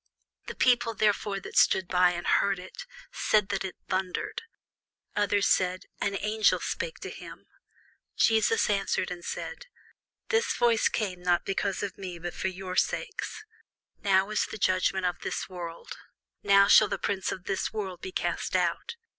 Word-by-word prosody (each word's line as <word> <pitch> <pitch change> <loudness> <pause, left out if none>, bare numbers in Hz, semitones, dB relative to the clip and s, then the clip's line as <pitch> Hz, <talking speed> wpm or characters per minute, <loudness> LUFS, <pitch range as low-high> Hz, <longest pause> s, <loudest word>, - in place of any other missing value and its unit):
The - - -6
people 240 -2 +3
therefore, 205 -2 +1
that - - -10
stood 190 -2 +4
by, 180 0 +3
and 175 0 -5
heard 200 -1 +2
it, 180 +1 -10 0.2
said 210 -2 +2
that 195 -1 -1
it 190 - -5
thundered: 185 -1 -2 0.7
others 205 -1 +2
said, 185 0 +1 0.2
An 200 -1 0
angel 215 0 +2
spake 485 - -4
to - - -6
him. - - -11 0.7
Jesus 225 - +3
answered 195 -2 0
and 175 -1 -6
said, - - -6 0.6
This 460 0 +1
voice 235 -2 +3
came 185 -5 -3
not 175 -1 +1
because 195 0 -1
of 200 -1 -5
me, 180 -3 -6
but 175 +1 -6
for - - -2
your 185 0 -5
sakes. 430 - -2 0.6
Now 195 0 +3
is 215 - +1
the - - -7
judgment 185 -1 +1
of 180 - -1
this - - -4
world: 170 -2 -8 0.4
now 200 0 +5
shall 215 - +7
the 200 - -2
prince 195 -2 -2
of 185 - -6
this 195 0 -2
world 190 -5 -5
be 185 - -6
cast - - -2
out. 465 - 0
195 Hz, 165 wpm, -28 LUFS, 185-210 Hz, 0.7 s, shall